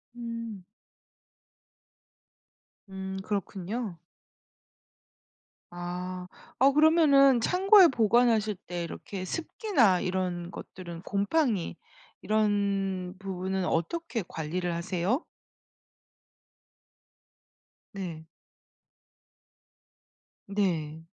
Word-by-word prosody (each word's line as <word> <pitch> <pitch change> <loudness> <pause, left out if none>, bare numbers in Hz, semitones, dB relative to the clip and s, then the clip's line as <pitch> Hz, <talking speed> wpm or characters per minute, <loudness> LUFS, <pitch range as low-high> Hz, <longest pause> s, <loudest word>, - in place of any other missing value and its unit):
음. 230 -4 -6 2.3
음 190 0 -5
그렇군요. 200 0 -3 1.7
아 180 +1 -5 0.3
어 275 +2 +6
그러면은 290 -4 +6
창고에 380 - +6
보관하실 225 -3 +3
때 175 -1 -3
이렇게 185 +2 -6
습기나 265 - +1
이런 180 -1 -2
것들은 170 -3 -9
곰팡이 200 - 0 0.5
이런 200 -3 0
부분은 190 -1 -3
어떻게 235 - -1
관리를 175 +3 -3
하세요? 180 - -1 2.7
네. 175 -5 -6 2.2
네. 165 -6 -1
195 Hz, 140 characters per minute, -28 LUFS, 180-235 Hz, 2.7 s, 어